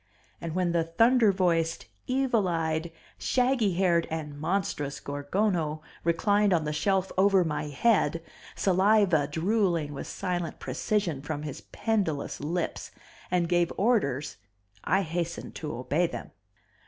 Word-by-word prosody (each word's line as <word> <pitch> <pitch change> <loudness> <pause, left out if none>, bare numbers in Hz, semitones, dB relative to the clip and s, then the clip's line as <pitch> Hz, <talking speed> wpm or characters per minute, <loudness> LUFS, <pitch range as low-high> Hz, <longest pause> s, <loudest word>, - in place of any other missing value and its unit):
And 165 -1 -4
when 180 -2 +1
the 170 -1 +2
thunder 225 +7 +4
voiced, 170 -3 0 0.2
evil 255 -6 +1
eyed, 165 -1 -1 0.3
shaggy 250 -6 +2
haired 175 -2 +2
and 155 -2 -4
monstrous 150 -4 -2
Gorgono 155 +2 -1 0.2
reclined 200 +4 +2
on 165 -3 +2
the 150 0 -2
shelf 190 +5 +1
over 195 -1 +5
my 150 -2 -2
head, 165 - +1 0.3
saliva 190 -5 +3
drooling 170 -1 0
with 140 - -6
silent 175 -3 -3
precision 185 -10 -1
from 150 0 -4
his 150 -3 -6
pendulous 195 -10 -1
lips, 165 +4 -3 0.4
and 175 -1 +1
gave 175 -1 +2
orders 155 - +1 0.5
I 195 +1 +2
hastened 170 0 -4
to 150 -2 -5
obey 150 +7 +1
them. 120 -7 -7
170 Hz, 130 wpm, -28 LUFS, 155-195 Hz, 0.5 s, over